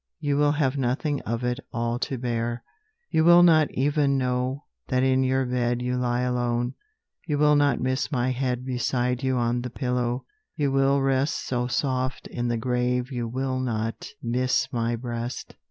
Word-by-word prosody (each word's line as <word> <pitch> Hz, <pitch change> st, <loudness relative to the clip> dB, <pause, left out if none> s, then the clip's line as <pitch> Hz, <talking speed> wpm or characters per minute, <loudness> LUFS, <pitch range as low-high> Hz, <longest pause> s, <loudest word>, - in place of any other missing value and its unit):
You 145 Hz, -1 st, 0 dB
will 145 Hz, 0 st, +3 dB
have 145 Hz, -2 st, 0 dB
nothing 135 Hz, +3 st, 0 dB
of 115 Hz, +2 st, -2 dB
it 125 Hz, 0 st, -1 dB
all 120 Hz, 0 st, -1 dB
to 135 Hz, -, -2 dB
bear: 120 Hz, -1 st, -2 dB, 0.5 s
You 160 Hz, -, +3 dB
will 175 Hz, +1 st, +8 dB
not 160 Hz, -3 st, +5 dB
even 140 Hz, 0 st, +1 dB
know 125 Hz, +2 st, -1 dB, 0.2 s
that 130 Hz, -1 st, +1 dB
in 130 Hz, 0 st, +3 dB
your 130 Hz, 0 st, +1 dB
bed 120 Hz, -1 st, 0 dB
You 125 Hz, 0 st, -1 dB
lie 125 Hz, -1 st, 0 dB
alone. 120 Hz, 0 st, 0 dB, 0.5 s
You 150 Hz, -3 st, 0 dB
will 150 Hz, 0 st, +5 dB
not 145 Hz, -1 st, +3 dB
miss 130 Hz, +3 st, -1 dB
my 130 Hz, -2 st, +1 dB
head 125 Hz, -1 st, -2 dB
Beside 125 Hz, 0 st, -1 dB
you 130 Hz, -1 st, 0 dB
on 120 Hz, 0 st, 0 dB
the 125 Hz, -, -4 dB
pillow: 125 Hz, 0 st, -2 dB, 0.3 s
you 145 Hz, -4 st, 0 dB
will 135 Hz, 0 st, +3 dB
rest 135 Hz, +2 st, 0 dB
So 125 Hz, -1 st, -1 dB
soft 130 Hz, 0 st, -1 dB
in 120 Hz, 0 st, -3 dB
the 120 Hz, -1 st, 0 dB
grave 125 Hz, +2 st, 0 dB
you 120 Hz, -2 st, -2 dB
will 130 Hz, +2 st, -2 dB
not 115 Hz, -3 st, -3 dB
miss 125 Hz, +2 st, +1 dB
my 120 Hz, 0 st, 0 dB
breast. 120 Hz, +1 st, -5 dB
125 Hz, 175 wpm, -25 LUFS, 120-135 Hz, 0.5 s, will